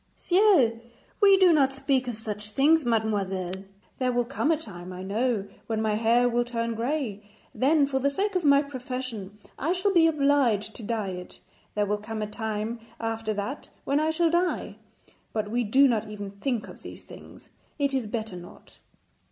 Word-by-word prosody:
'Ciel! 350 - +4 0.4
We 395 -1 +7
do 370 -3 +6
not 275 -3 +3
speak 270 -1 0
of 240 -3 -3
such 210 -1 -5
things, 290 +5 +3
mademoiselle. 195 -5 -1 0.4
There 255 -1 +1
will 245 0 +1
come 275 +4 -1
a 325 - +3
time, 185 - -9
I 185 0 -7
know, 210 +1 0 0.2
when 225 -1 -1
my 220 -1 +1
hair 230 +3 +3
will 240 0 +1
turn 230 -1 -2
grey; 235 -3 -2 0.3
then 285 +2 +3
for 270 -1 -1
the 280 +2 +2
sake 400 +8 -1
of 365 - +1
my 280 -1 +5
profession 255 -7 -6 0.2
I 325 +5 +1
shall 380 +2 0
be 330 -2 +6
obliged 275 -9 +2
to - - -8
dye 215 -2 -2
it. 180 -1 -8 0.4
There 210 0 +2
will 210 +1 -1
come 215 0 -5
a - - -3
time 220 +1 -3 0.2
after 225 -1 -2
that 205 +8 -5
when 280 +1 +1
I 310 +1 +1
shall 330 +1 +2
die; 350 +1 0 0.6
but 215 -1 -2
we 240 +1 +1
do 265 +6 +5
not 225 -4 0
even 205 -2 -6
think 225 +3 -3
of - - -12
these - - -10
things, - - -14 0.3
it 280 -1 +1
is 260 -5 0
better 220 -3 -4
not.' 175 0 -13
235 Hz, 185 wpm, -27 LUFS, 210-280 Hz, 0.6 s, We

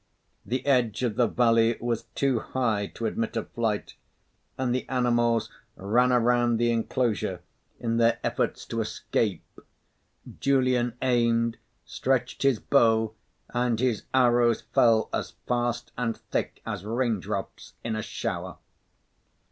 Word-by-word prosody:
The 130 +4 -3
edge 125 -5 +2
of 115 -4 0
the 120 0 +3
valley 115 0 +3
was 120 -1 -2
too 135 -4 +1
high 110 -5 -1
to 115 - -4
admit 115 +1 -2
of 115 - -4
flight; 110 -3 -2 0.6
and 130 -2 0
the 130 - -3
animals 120 -3 +1 0.2
ran 120 +6 +2
around 120 -1 +3
the 120 +1 +2
enclosure 115 -5 -1 0.4
in 115 -1 -1
their 115 0 +3
efforts - - -1
to 115 - -2
escape. 105 -3 -1 1.0
Julian 130 -3 +2
aimed, 115 -2 +2 0.3
stretched 130 -2 -1
his 135 -4 +3
bow 110 -3 +3 0.4
and 120 -2 0
his 125 -4 +1
arrows 120 -2 +3
fell 115 -2 +4
as - - -3
fast 120 0 -1
and 115 -2 -2
thick - - -4
as - - -4
raindrops 115 - -3
in 115 -1 -2
a 110 - -2
shower. - - -4
120 Hz, 130 wpm, -27 LUFS, 115-125 Hz, 1.0 s, fell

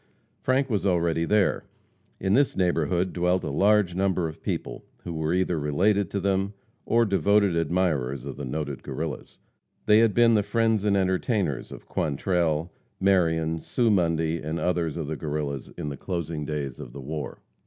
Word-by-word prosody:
Frank 130 +1 +2
was 105 -6 -1
already 85 -3 +1
there. 105 +1 +2 0.6
In 95 0 +1
this 140 +3 +3
neighborhood 90 0 +1
dwelt 90 +1 +1
a 75 - -3
large 100 +3 +3
number 95 -2 +1
of 80 - -9
people - - -4 0.2
who 85 - -5
were 80 0 -1
either 90 -2 +1
related 95 +7 +1
to 100 - -2
them 100 +1 0 0.3
or 115 0 +4
devoted 100 -2 +3
admirers 80 -6 0
of - - -6
the 70 - -7
noted 70 +1 -4
Guerrillas. 80 -1 -5 0.5
They 105 0 +6
had 115 -2 +3
been 120 -1 +5
the 105 - +4
friends 115 0 +1
and 100 -1 +3
entertainers 95 - 0
of - - -10
Quantrell, 80 +1 0 0.3
Marion, 80 -4 +2
Sue 115 +6 +1
Mundy, 85 -3 +1
and 80 +2 -3
others 85 -3 -1
of 80 - -3
the 80 +2 -3
Guerrillas 75 -3 -3
in 75 - -4
the 70 - -6
closing 85 -4 -4
days 70 -4 -4
of - - -9
the 70 - -8
war. 75 +3 -5
85 Hz, 170 wpm, -26 LUFS, 80-100 Hz, 0.6 s, They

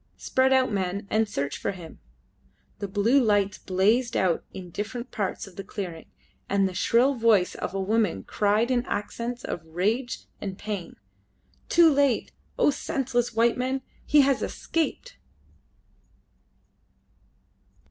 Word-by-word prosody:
Spread 260 0 +2
out, 260 -2 +3
men, 195 0 -2
and 220 0 +2
search 140 -6 -3
for - - -2
him!" 175 -4 -11 0.8
Blue 205 +7 +2
lights 205 -3 +2
blazed 215 +6 +1
out 180 -3 +1
in 180 -2 -9
different 235 +6 -5
parts 200 -3 -3
of 195 -3 -15
the 195 - -5
clearing, 180 -5 -6 0.4
and 195 -1 +3
the 185 - -6
shrill 240 +9 +3
voice 225 -7 +3
of - - -5
a - - -1
woman 200 - +1
cried 215 +4 +1
in 245 -1 +2
accents 235 +4 -4
of 165 - -4
rage 210 +10 -2 0.2
and 195 -2 -5
pain 205 -6 -5 0.7
"Too 335 -3 +6
late! 280 -3 +2 0.3
O - - +4
senseless 265 -6 -1
white 230 +1 +3
men! 260 +1 -1 0.2
He 295 - +5
has 275 -1 +2
escaped!" 335 +9 -3
215 Hz, 135 wpm, -26 LUFS, 195-255 Hz, 0.8 s, Too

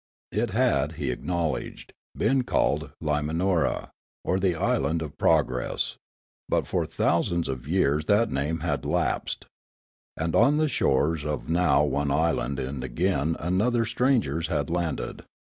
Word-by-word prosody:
It - - 0
had, 70 +3 +1
he 70 -5 -2
acknowledged, 80 -5 -3 0.2
been 130 +5 +2
called - - 0
Limanora, 80 +4 0 0.3
or 95 - +1
the 95 -2 +1
island 80 +1 0
of 75 -2 -8
progress; 65 0 +1 0.5
but - - +1
for - - -1
thousands 85 0 +1
of 65 0 -5
years' 75 -3 +2
that 105 +5 +3
name 75 +4 -1
had 85 - -1
lapsed. - - -1 0.7
And 80 +1 -1
on 145 +2 +5
the 155 0 +2
shores 75 - +1
of 75 -2 -4
now 80 -4 +3
one 70 0 0
island 70 -2 0
and 65 0 -4
again 80 +4 0
another 110 +8 +1
strangers 110 - +1
had 75 -4 -1
landed. 85 -3 -2
80 Hz, 135 wpm, -26 LUFS, 70-90 Hz, 0.7 s, on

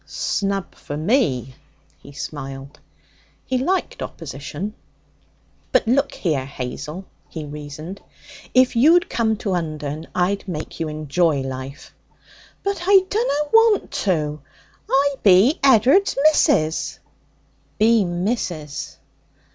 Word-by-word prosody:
'Snub 195 -2 -2
for 145 - -7
me!' 150 - +1 0.5
he 140 - -13
smiled. 135 0 -7 0.7
He 255 - 0
liked 365 +8 -1
opposition. 155 +6 -6 1.0
'But - - +2
look 275 +4 +2
here, 150 -8 -1
Hazel,' 140 +7 -6 0.2
he 160 -2 -6
reasoned. 150 +5 -8 0.5
'If 255 0 +4
you'd 320 +9 +5
come 220 -2 +1
to 200 -3 -2
Undern, 155 -2 -4
I'd 195 +3 0
make 160 -3 -6
you 165 - -1
enjoy 155 0 0
life.' 135 +1 -7 0.7
'But 395 -3 -2
I 385 -1 +6
dunna 300 -10 0
want 450 -2 +4
to. 155 -6 -1 0.5
I 275 +1 +2
be 200 +9 +5
Ed'ard's 270 - +5
missus.' 290 - +3 0.8
'Be 225 0 +4
missus!' 175 -5 -3
180 Hz, 105 wpm, -21 LUFS, -, 1.0 s, I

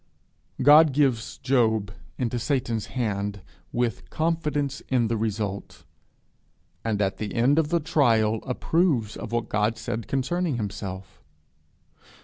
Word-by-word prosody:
God 150 +1 +7
gives 130 -5 +1
Job 110 -6 +1 0.3
into 120 -1 -1
Satan's 120 -4 -1
hand 105 -5 -2 0.3
with 120 -3 -2
confidence 150 -4 -1
in 120 -4 +2
the 115 - 0
result; 105 -2 -3 1.0
and 110 -3 -1
at 95 0 -1
the 105 -2 -5
end 130 +7 +4
of 155 -2 0
the 170 - +2
trial 115 -8 +2
approves 130 - +1
of - - -7
what 120 -1 -2
Job 105 +1 +2
has - - -12
said 110 0 -4
concerning 150 +4 -1
himself. 100 -3 -6
120 Hz, 125 wpm, -25 LUFS, 105-140 Hz, 1.0 s, God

